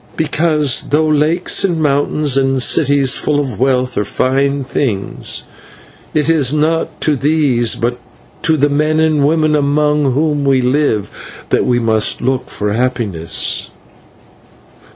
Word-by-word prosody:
"Because, 155 -3 0
though 155 +2 +2
lakes 155 +4 +1
and 175 -4 0
mountains 145 -1 +1
and 135 -1 +1
cities 140 +1 +2
full 150 -1 0
of 130 -8 -4
wealth 130 -1 0
are - - 0
fine 135 +6 0
things, 120 -7 -3 0.7
it 150 -1 +1
is 150 -6 +2
not 155 +2 -1
to 150 - +1
these, 140 -4 +1
but 120 +1 -2 0.4
to 160 -1 +1
the 145 0 +2
men 155 +2 0
and 155 -3 +2
women 155 -1 +1
among 150 -1 +1
whom 150 +1 0
we 135 -1 +2
live, 125 -5 -2
that - - +1
we 125 - +2
must 110 -2 +1
look 130 -1 -2
for 105 0 -3
happiness." 110 -9 -2
140 Hz, 135 wpm, -15 LUFS, 125-150 Hz, 0.7 s, though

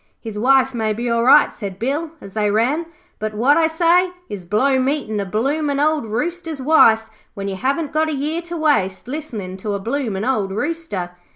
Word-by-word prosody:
'His 220 -3 -7
wife 265 +4 +3
may 220 -2 0
be 235 +2 -2
all 235 0 +2
right,' 275 +4 +6
said 195 -3 -6
Bill 285 +9 -2
as 195 - -11
they 210 -1 +1
ran, 255 +11 +1 0.3
'but 215 0 -4
what 255 +7 +4
I 325 -1 +4
say 340 +3 +3 0.2
is, 195 -4 -7
blow 260 +8 +2
meetin' 260 -5 -1
a 200 - -2
bloomin' 280 +8 0
old 300 -4 +1
Rooster's 325 +7 -3
wife 230 -6 +4 0.3
when 200 -1 -4
you 195 - -3
haven't 280 - -1
got 315 +1 +1
a - - -2
year 300 +4 -2
to 345 - -4
waste 235 - +1
listenin' 230 -10 -6
to 205 +1 -3
a - - -3
bloomin' 225 -2 -2
old 215 -7 0
Rooster.' 215 - -3
255 Hz, 195 wpm, -20 LUFS, 210-305 Hz, 0.3 s, right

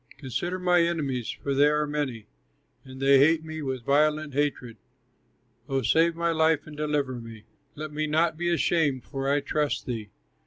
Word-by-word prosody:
Consider 175 +7 -3
my 180 -1 +3
enemies, 145 -8 -1
for 140 - -3
they 140 +2 +5
are 150 0 +1
many, 145 -7 -3 0.6
And 130 0 -11
they 135 0 +5
hate 160 +3 +4
me 160 0 -6
with 130 -4 -4
violent 150 +1 +2
hatred; 135 -5 -2 0.9
Oh 135 -1 0
save 165 +7 +3
my 170 0 0
life 160 -2 +2
and 155 - -11
deliver 145 -4 -1
me, 115 -2 -11 0.3
Let 155 +1 -6
me 155 +1 -2
not 160 +2 +1
be 175 +2 -1
ashamed, 160 -6 +1
for 135 -1 -4
I 145 +1 +2
trust 150 +1 -1
thee. 110 -4 -5
150 Hz, 170 wpm, -26 LUFS, 135-160 Hz, 0.9 s, they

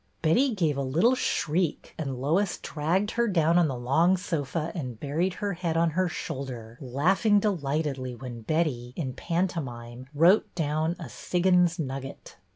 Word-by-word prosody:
Betty 240 - +3
gave 160 -7 +1
a - - 0
little 160 - +3
shriek, 170 - -1
and 135 -5 -4
Lois 175 +8 +1
dragged 175 +8 -1
her 235 0 +1
down 170 -3 +3
on 170 - +4
the 135 -3 -3
long 160 +10 +3
sofa 165 -2 -2
and 125 - -5
buried 165 +8 -1
her 205 -1 -2
head 170 -2 -2
on 165 0 +3
her 185 +2 +1
shoulder, 125 -7 -6
laughing 185 - +2
delightedly 145 - -1
when 120 -1 -8
Betty, 125 -3 -1
in 130 -6 -3
pantomime, 130 -10 -3
wrote 175 +8 +4
down 160 +1 0
a 165 - -7
Siggins 180 +4 +2
Nugget." 135 - -6
160 Hz, 155 wpm, -27 LUFS, 135-180 Hz, -, on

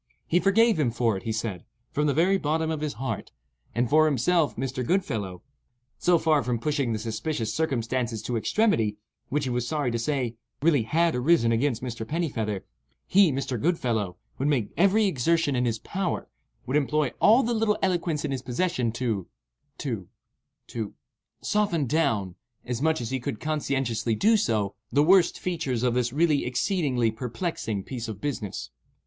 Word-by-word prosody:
"He 175 - +2
forgave 215 0 +4
him 140 -5 +2
for 115 -2 +1
it," 95 - -5
he 115 - -3
said, 110 -5 -3 0.3
"from 150 +1 +1
the 145 - +2
very 190 +5 +3
bottom 160 +1 0
of 155 -2 -3
his 150 -2 -2
heart; 115 -4 -4 0.4
and 120 +1 +2
for 155 +4 +5
himself 150 +3 +2
(Mr. 130 0 -3
Goodfellow), 110 - -1 0.6
so 175 -1 +4
far 155 -2 +3
from 125 -2 -1
pushing 140 0 -1
the 110 - 0
suspicious 110 +1 -3
circumstances 120 -6 -1
to 120 - -2
extremity, 115 - +1 0.3
which 145 +1 0
he 130 - -2
was 120 0 -1
sorry 145 -4 0
to 115 - -1
say, 120 -2 -1 0.3
really 155 -5 +4
had 165 +8 +2
arisen 125 -2 +3
against 120 +1 0
Mr. 115 -3 -4
Pennifeather, 110 - -2 0.4
he 195 -4 +5
(Mr. 130 -3 -2
Goodfellow) 115 - 0 0.2
would 135 - +1
make 130 -8 +1
every 200 +4 +4
exertion 165 -2 +1
in 125 0 +1
his 115 -2 0
power, 185 - -3 0.4
would 135 +4 +1
employ 150 -2 +1
all 230 +6 +6
the 240 - 0
little 220 -2 +2
eloquence 175 -5 0
in - - -2
his 135 -2 -2
possession 130 -2 -1
to—to—to—soften 120 - -5
down, 115 - +1 0.3
as 125 0 -3
much 160 -2 +2
as 115 - -4
he 130 - -1
could 110 -3 -4
conscientiously 135 -7 -1
do 220 - +4
so, 110 - +1 0.2
the 145 - +4
worst 180 +2 +5
features 155 -10 -2
of 125 -1 +2
this 125 -1 0
really 150 0 +2
exceedingly 125 - +1
perplexing 115 - -3
piece 120 0 -5
of 110 -3 -6
business." 105 - -4
130 Hz, 165 wpm, -26 LUFS, 115-160 Hz, 0.6 s, all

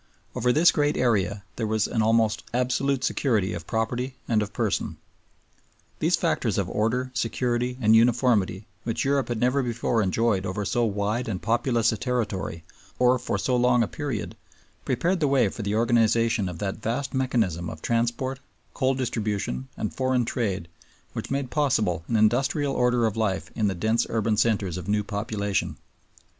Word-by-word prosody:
Over 125 +1 +1
this 160 +7 +5
great 145 -1 +1
area 105 -4 +1
there 110 - -1
was 110 -1 +1
an 115 - 0
almost 110 -1 +2
absolute 125 +2 0
security 110 -9 +1
of 85 -2 -7
property 125 +4 -2
and 110 -2 +2
of 105 -1 -3
person. - - -1 1.0
These - - +3
factors - - 0
of - - 0
order, 125 +4 -1
security, 120 +1 -1
and 110 -2 +5
uniformity, 115 -4 +3 0.2
which 115 +2 -2
Europe 140 -1 +1
had 120 -2 -2
never 125 +4 +2
before 120 -2 0
enjoyed 105 0 +1
over 100 +2 -3
so 120 +3 +1
wide 105 +3 -1
and 95 -4 -2
populous 120 +1 +1
a 110 - -3
territory 105 -8 -2 0.3
or 125 0 +4
for 115 - -2
so 125 +5 0
long 125 -1 +4
a - - -1
period, 135 -4 -4 0.5
prepared 175 +9 0
the 150 - +2
way 135 -6 +3
for 115 - -7
the 100 0 -1
organization 115 -2 +2
of 90 - -7
that 95 +2 -3
vast 125 +6 -2
mechanism 110 -11 0
of 80 - -9
transport, 120 +3 -1 0.3
coal 130 -1 +1
distribution, 105 - -2
and - - -3
foreign 130 -2 +1
trade 100 -8 -2 0.5
which - - -5
made 135 -2 -2
possible 110 - +1
an 115 - -1
industrial 135 +6 +2
order 125 -2 +2
of 110 - 0
life 105 -4 -1
in 110 -2 0
the 95 - -1
dense 110 +6 +1
urban 110 -1 +1
centers 105 -5 +1
of 90 - -7
new 105 0 +1
population. 100 -1 -2
115 Hz, 170 wpm, -25 LUFS, 105-125 Hz, 1.0 s, this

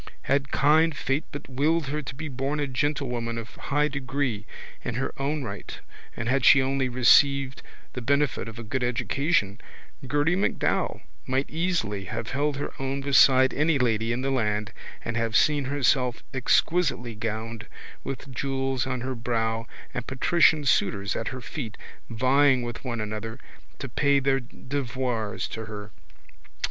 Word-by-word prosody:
Had 140 0 +1
kind 155 +2 +3
fate 135 +2 -1
but 145 - -7
willed 150 +5 +1
her 150 +2 -2
to 135 -2 -7
be 160 +3 -5
born 135 +2 -2
a 145 - +1
gentlewoman 125 -4 -1
of 115 -1 -7
high 150 +1 0
degree 130 -5 -2 0.4
in 115 - -3
her 130 - -2
own 145 +1 -1
right 100 -4 -7 0.4
and 115 - -3
had 135 +2 +2
she 140 - +8
only 135 0 +1
received 135 +2 +4 0.3
the 125 - -5
benefit 140 +1 +1
of 115 - -10
a 115 - -6
good 125 +4 -2
education 125 - 0 0.5
Gerty 145 +5 +2
MacDowell 195 - 0 0.3
might 130 +2 0
easily 155 - -1
have 115 +5 -4
held 145 +1 0
her 145 - -4
own 135 +1 -2
beside 130 -1 +5
any 150 +1 +2
lady 115 -3 +1
in 120 +2 -1
the 135 - 0
land 105 -5 0 0.3
and 115 - -3
have 115 -1 -1
seen 150 -3 +4
herself 130 -3 +1
exquisitely 135 -1 +1
gowned 110 0 -4 0.4
with 135 0 -6
jewels 135 0 -1
on 130 -2 -2
her 130 +1 -3
brow 115 -1 -1 0.3
and 125 - -4
patrician 155 +2 +3
suitors 100 -6 +1
at 115 - -3
her 130 -1 -4
feet 120 -5 -6 0.3
vying 130 +2 +3
with 120 -1 -6
one 120 -3 -3
another 110 +3 -5 0.4
to 140 - -5
pay 140 +3 +2
their 135 0 +2
devoirs 125 -3 -3
to 110 0 -5
her. 105 -1 -8
130 Hz, 155 wpm, -26 LUFS, 115-140 Hz, 0.5 s, she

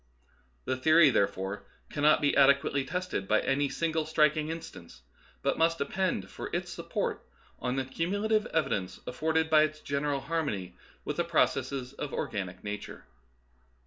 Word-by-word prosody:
The 130 - 0
theory, 155 +3 +6
therefore, 100 -2 -1 0.3
cannot 150 +1 +4
be 145 - +2
adequately 140 0 +4
tested 180 - -3
by 110 +1 +4
any 140 +1 +1
single 160 0 -1
striking 155 -1 +2
instance, 160 - -8 0.4
but - - 0
must 165 +1 +3
depend 165 - -1
for - - -6
its - - -3
support - - -3 0.4
on 125 +1 -1
the 135 -1 -1
cumulative 205 +10 0
evidence 135 - -1
afforded 160 +5 0
by 155 -1 +6
its 155 0 0
general 140 -1 -1
har 165 +4 -1
mony 95 - -4 0.3
with - - -3
the - - +2
processes 130 -1 0
of 140 0 -5
organic 95 -3 -4
nature. 105 0 -6
145 Hz, 145 wpm, -29 LUFS, 125-160 Hz, 0.4 s, theory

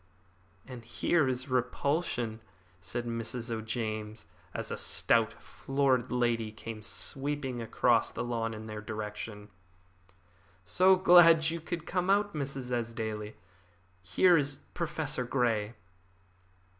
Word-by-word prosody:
"And 125 -3 -9
here 145 +5 +1
is 130 0 -2
repulsion," 125 -2 -1 0.4
said 120 +7 -4
Mrs. 115 0 -3
O'James, 110 -2 -4 0.3
as - - -5
a - - -1
stout, - - +1
florid 135 -3 0
lady 120 -3 +1
came 110 0 -8
sweeping 135 +3 -3
across 115 - +2
the - - -4
lawn 115 -2 -2
in 110 0 -8
their 110 -1 -6
direction. 105 -1 -6 1.2
"So 185 - +5
glad 165 -3 +7
you 170 - -3
have 170 -2 -3
come 180 +1 -1
out, 205 +1 +3
Mrs. 135 -4 -4
Esdaile! 110 -3 -3 0.7
Here 175 - +4
is 145 -1 0 0.2
Professor 160 -5 -2
Grey." 120 -3 0
120 Hz, 115 wpm, -30 LUFS, 110-145 Hz, 1.2 s, glad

